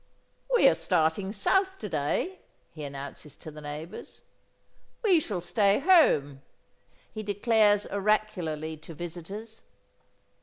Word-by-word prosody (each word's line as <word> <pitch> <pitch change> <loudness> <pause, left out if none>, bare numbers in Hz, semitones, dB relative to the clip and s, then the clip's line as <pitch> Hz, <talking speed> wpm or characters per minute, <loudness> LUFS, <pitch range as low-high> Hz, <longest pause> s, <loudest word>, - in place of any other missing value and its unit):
"We 475 - +6
are - - +6
starting 165 +3 0
south 380 - +1
to - - -6
day," 380 +1 -2 0.3
he 155 - -9
announces 140 +1 -8
to 155 - -10
the 150 0 -11
neighbours. 150 +3 -8 0.8
"We 375 -7 +5
shall 205 - -4
stay 200 +2 +2
home," 275 - +4 0.7
he 215 - -5
declares 205 0 +2
oracularly 190 -7 -1
to 160 +1 -12
visitors. 180 +7 -8
195 Hz, 115 wpm, -28 LUFS, 155-220 Hz, 0.8 s, We